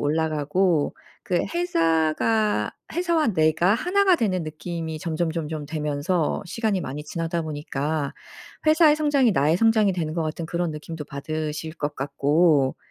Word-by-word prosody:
올라가고 155 +2 +1 0.3
그 180 - 0 0.2
회사가 210 - +1 0.2
회사와 340 -4 +1
내가 165 +1 +3
1 375 +10 +1
가 375 -3 +5
되는 185 - 0
느낌이 160 +1 -5
점점점점 160 -1 -3
되면서 150 +3 -1
시간이 205 0 -1
많이 145 0 -5
지나다 165 +1 -3
보니까 145 -1 -3 0.5
회사의 310 -1 +6
성장이 290 -6 +3
나의 155 +1 +3
성장이 220 -2 +3
되는 160 -3 -2
것 170 - 0
같은 160 +1 -3
그런 170 0 -2
느낌도 150 +1 -7
받으실 155 +2 -4
것 145 -2 -3
같고. 140 +1 +2
165 Hz, 300 characters per minute, -24 LUFS, 150-195 Hz, 0.5 s, 회사의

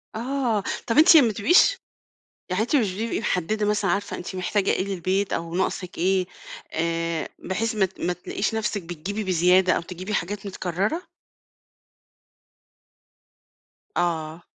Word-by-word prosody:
آه، 240 -3 -1 0.2
طب 230 - 0
أنتِ 320 +2 +9
ما 275 -6 +6
بتبقيش 330 - +4 0.7
يعني 185 +4 +1
أنتِ 245 +6 +1
مش 215 -8 +1
بتبقي 225 +4 -2
محددة 210 0 0
مثلًا 210 0 +1
عارفة 200 0 -1
أنتِ 180 +2 -7
محتاجة 195 +2 0
إيه - - +1
للبيت 195 +1 -1
أو 165 0 -3
ناقصِك 185 0 -2
إيه 185 +1 +2 0.5
آآ 165 0 -1
بحيث 225 +4 -2
ما 210 -3 +3
ت 190 - -19
ما 180 - 0
تلاقيش 180 +4 -3
نفْسِك 210 -2 -1
بتجيبي 175 +5 -5
بزيادة 185 +1 +4
أو - - +1
تجيبي 185 +4 -6
حاجات 205 +3 -2
متكررة؟ 195 - -2 3.0
آه. 160 -1 -1
190 Hz, 135 wpm, -24 LUFS, 180-215 Hz, 3.0 s, أنتِ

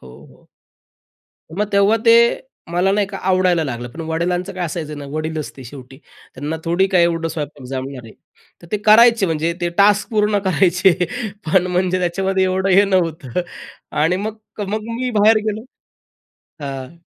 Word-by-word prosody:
हो, 65 - -14 0.2
हो. - - -22 1.1
मग 210 +4 0
तेव्हा 200 +2 +4
ते 230 - +8 0.6
मला 180 +3 +2
नाही 205 -1 +1
का 195 - -7
आवडायला 185 -3 +2
लागलं 120 -2 -5
पण 155 +7 -10
वडिलांचं 175 +3 -2
काय 180 -1 -3
असायचं 155 -2 -5
ना, 145 - -7
वडील 155 +1 -3
असते 140 -3 -7
शेवटी 130 +1 -12 0.4
त्यांना 150 +4 -4
थोडी 175 +3 +2
काय 175 -2 +5
एवढं 165 -1 0
स्वयंपाक 150 -4 -6
जमणार 130 -1 -6
आहे? 110 - -12 0.5
तर - - -12
ते 210 - +2
करायचे 230 -1 +6
म्हणजे 165 +1 -1
ते 175 - 0
टास्क 205 +2 +4
पूर्ण 210 -2 +2
करायचे 185 +1 +3 0.5
पण 180 +3 +2
म्हणजे 180 0 0
त्याच्यामध्ये 190 +2 0
एवढं 190 +1 0
हे 195 +2 +6
नव्हतं 170 -7 -1 0.6
आणि 165 +4 +2
मग, 215 +3 -4 0.2
अ, - - -2
मग 215 +1 -2 0.2
मी 255 -1 -1
बाहेर 220 +2 +6
गेलो 215 +2 -3 1.0
हं. 135 +3 -7
180 Hz, 165 wpm, -19 LUFS, 155-195 Hz, 1.1 s, ते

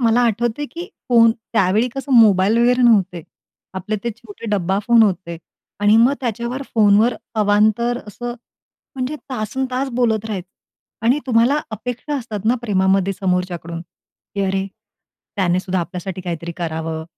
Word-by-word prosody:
मला 235 0 +3
आठवतंय 235 +5 0
की 345 +1 -6 0.2
फोन, 230 -2 +6 0.2
त्यावेळी 215 +3 +2
कसं 270 0 -4
मोबाईल 215 -2 +5
वगैरे 245 +1 +3
नव्हते. 190 -7 +3 0.5
आपले 190 +3 -3
ते 235 - 0
छोटे 225 -1 -11
डब्बा 195 -1 0
फोन 235 -1 +6
होते 180 -4 -1 0.4
आणि 205 +1 +5
मग 240 +4 +5
त्याच्यावर 240 +2 -3
फोनवर 215 +2 +4 0.3
अवांतर 215 +4 +2
असं, 240 +3 -6 0.6
म्हणजे 265 +3 -3
तासनतास 255 +3 -2
बोलत 225 -3 +1
राहायचे. 195 -4 -5 0.6
आणि 260 +5 +4
तुम्हाला 250 +5 +3
अपेक्षा 245 +6 -4
असतात 215 -4 -6
ना, 235 +3 +3
प्रेमामध्ये 195 -2 +2
समोरच्याकडून, 180 -3 -2 0.5
की 200 - -2
"अरे! 190 0 -1 0.7
त्यानेसुद्धा 185 0 0
आपल्यासाठी 180 +1 -5
काहीतरी 170 -1 -5
करावं, 160 -1 -4
215 Hz, 135 wpm, -20 LUFS, 190-240 Hz, 0.7 s, फोन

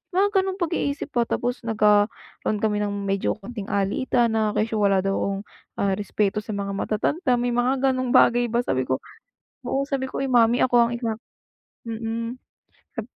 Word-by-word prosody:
Mga 400 +1 +3
gano'ng 380 0 -1
pag-iisip 310 -4 -2
ba, 235 -1 +1
tapos 245 +1 -1
nagkaroon 210 -1 +1
kami 210 -1 +1
ng 205 -1 -2
medyo 195 -1 0
kaunting 210 0 -8
alitan 225 +4 +1
na 215 -1 0
kesyo 220 0 0
wala 195 -2 +3
daw 195 - 0
akong, 195 0 -2 0.3
ah, 200 - 0
respeto 205 0 0
sa 215 -1 -5
mga 200 0 -3
matatanda, 250 - 0
may 245 0 0
mga 255 +3 +2
gano'ng 255 -1 -1
bagay 240 0 +5
ba. 235 +1 0
Sabi 130 - -1
ko, 130 - -1 0.7
oo, 275 +1 0
Sabi 270 -2 -2
ko, 270 - -3
"Ay - - -2
mommy 240 0 +4
ako 240 -2 +4
ang - - -5
ikakasal," 230 -2 -4 0.7
mm. 230 +2 -4 0.6
Sab 225 - -3
230 Hz, 175 wpm, -24 LUFS, 205-255 Hz, 0.7 s, bagay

